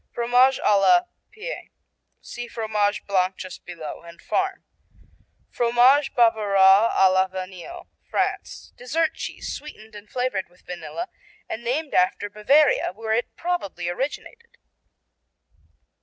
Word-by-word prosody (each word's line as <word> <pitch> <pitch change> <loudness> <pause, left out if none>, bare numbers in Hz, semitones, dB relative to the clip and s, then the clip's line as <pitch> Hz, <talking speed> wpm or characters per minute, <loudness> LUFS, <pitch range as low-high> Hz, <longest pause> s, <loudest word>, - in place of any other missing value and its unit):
Fromage 245 +3 +3
à 205 -1 +4
la 355 - +6 0.3
Pie 435 +4 -7 0.5
see 240 0 -7
Fromage 210 -3 -1
Blanc 185 -1 +1
just 185 -1 -9
below, 165 -4 -8
and 170 0 -14
Farm 380 - -2 0.9
Fromage 245 +4 +3
Bavarois 210 -3 +5
à 190 -1 +4
la 190 0 +3
Vanille 190 - -8 0.2
France - - -3
Dessert 315 +6 0
cheese - - -6
sweetened 220 -7 -11
and 205 0 -12
flavored 250 -8 -2
with 180 +1 -26
vanilla 260 - -6 0.4
and 230 - -6
named 280 +6 -2
after 195 +3 +1
Bavaria 265 +2 +3
where 220 +2 -3
it 235 +2 -1
probably 265 - -3
originated. 295 - -6
220 Hz, 120 wpm, -24 LUFS, 190-270 Hz, 0.9 s, la